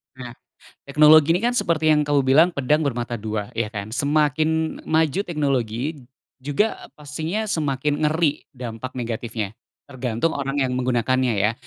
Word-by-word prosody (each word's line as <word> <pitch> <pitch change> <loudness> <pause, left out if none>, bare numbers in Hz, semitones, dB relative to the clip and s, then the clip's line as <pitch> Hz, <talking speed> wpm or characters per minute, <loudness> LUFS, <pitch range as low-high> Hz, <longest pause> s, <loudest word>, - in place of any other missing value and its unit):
Nah 125 -2 -8 0.5
teknologi 150 +2 +6
ini 180 - +1
kan 240 +2 0
seperti 160 -8 +1
yang 150 -1 +4
kamu 145 -1 +2
bilang 135 +6 +5
pedang 150 +2 +1
bermata 120 -3 -2
2, 105 -1 -4
ya 115 -2 -2
kan? 100 -1 -5
Semakin 155 +5 0
maju 160 +1 +1
teknologi 140 - -2 0.3
juga 145 +11 -1
pastinya 160 +8 -4
semakin 145 -3 -1
ngeri 155 -1 +1
dampak 125 -1 -7
negatifnya, 115 -3 -4 0.3
tergantung 130 +3 -2
orang 140 0 -2
yang 130 -1 0
menggunakannya 130 0 +1
ya. 105 +1 +1
140 Hz, 140 wpm, -22 LUFS, 120-155 Hz, 0.5 s, teknologi